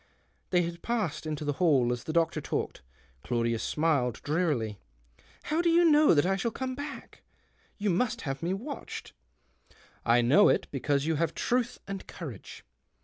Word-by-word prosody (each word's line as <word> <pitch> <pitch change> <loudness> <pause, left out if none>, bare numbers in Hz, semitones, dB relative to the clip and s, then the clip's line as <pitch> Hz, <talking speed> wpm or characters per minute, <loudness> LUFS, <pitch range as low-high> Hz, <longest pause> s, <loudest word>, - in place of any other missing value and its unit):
They 180 -1 +3
had 170 0 -5
passed 185 -10 -2
into 150 -1 -3
the 145 - 0
hall, 135 -8 +4
as 120 - -6
the - - -3
doctor 165 0 +1
talked. - - -3 0.4
Claudius 115 -1 0
smiled 145 -7 0
drearily. 145 - 0 0.3
" - - -29
How 320 +2 +2
do 345 - +2
you 340 +1 +5
know 300 - +6
that 145 - +4
I 195 +1 +1
shall 235 - 0
come 260 +3 -4
back? 285 +2 -8 0.6
You 205 -1 0
must 220 +7 0
have 135 0 -4
me 170 +2 -1
watched." 245 +10 -6 0.5
" - - -28
I 120 +1 +4
know 165 +13 +6
it, - - +2
because 140 +1 0
you 160 -1 +1
have 165 +2 0
truth 245 0 0
and 195 -1 -6
courage. 135 - -9
165 Hz, 175 wpm, -29 LUFS, 135-215 Hz, 0.6 s, know